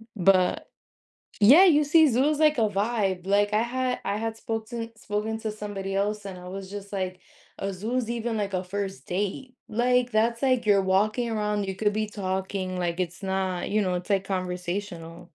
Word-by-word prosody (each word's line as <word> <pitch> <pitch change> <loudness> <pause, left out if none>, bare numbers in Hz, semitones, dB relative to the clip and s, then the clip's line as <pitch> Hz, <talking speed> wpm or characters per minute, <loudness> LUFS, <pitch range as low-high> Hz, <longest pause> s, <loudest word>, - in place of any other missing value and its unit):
but 185 -1 +3 0.7
yeah, 275 - +9
you 300 -4 +5
see 315 +2 +6
Zoo 255 +3 +2
is 305 -1 -1
like 305 -2 +4
a 220 - +4
vibe. 200 -3 -1
Like 205 +1 +2
I 215 - +3
had 255 +1 -1
I 200 +1 0
had 225 0 -3
spoke 225 -1 -4
to 230 -2 -5
spoken 215 +1 -3
to 220 - -2
somebody 205 -2 -5
else 205 +1 -1
and 190 -2 -6
I 180 - -10
was 190 0 -7
just 200 0 -8
like, 185 -1 -3 0.4
"A 195 0 -2
zoo's 225 +5 -2
even 235 -1 -2
like 200 -2 -2
a 185 - -1
first 195 +1 -5
date." 210 +8 -3
Like 245 +2 +2
that's 230 +2 +1
like, 255 -4 +2
you're 200 -2 +5
walking 215 +5 +1
around, 210 -2 -1
you 190 - -4
could 210 +1 +1
be 215 0 -1
talking, 190 -2 -3
like 175 0 -2
it's 180 +2 -3
not, 190 -2 -1
you 210 +1 +2
know, 185 -2 0
it's 180 +3 -5
like 195 -1 +2
conversational. 180 -2 -4
205 Hz, 195 wpm, -26 LUFS, 190-225 Hz, 0.7 s, yeah